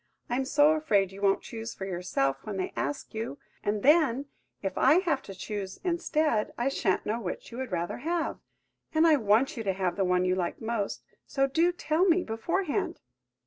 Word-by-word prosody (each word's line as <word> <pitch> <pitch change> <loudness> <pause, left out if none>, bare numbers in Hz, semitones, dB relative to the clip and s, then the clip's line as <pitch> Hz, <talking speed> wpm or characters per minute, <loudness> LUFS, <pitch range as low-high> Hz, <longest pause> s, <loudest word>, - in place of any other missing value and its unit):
I'm 260 +2 +1
so 290 +2 +5
afraid 215 - +2
you 195 +1 -10
won't 195 -1 +2
choose 225 0 -6
for 190 - -5
yourself 175 -7 -1
when 210 -2 -5
they 185 - -3
ask 290 - -3
you, 220 -10 -4 0.3
and 205 0 -1
then, 285 -3 +4 0.4
if 195 - -2
I 275 +4 +5
have 330 -8 0
to 195 - -10
choose 195 0 -5
instead, 315 - +1
I 240 +3 +1
shan't 195 -8 0
know 220 +3 -1
which 180 +3 -5
you 235 - -7
would 260 -4 -4
rather 175 -1 -2
have! 330 +5 -2 0.6
And 315 +1 +5
I 315 -2 +6
want 225 +3 +2
you 225 - -3
to 195 -2 0
have 185 -1 -1
the 195 - +2
one 180 0 +2
you 185 - +2
like 180 -2 -2
most–so 230 +4 -2
do 330 +6 +2
tell 345 0 +1
me 355 -1 +4
beforehand!" 330 - -1
230 Hz, 190 wpm, -28 LUFS, 195-305 Hz, 0.6 s, I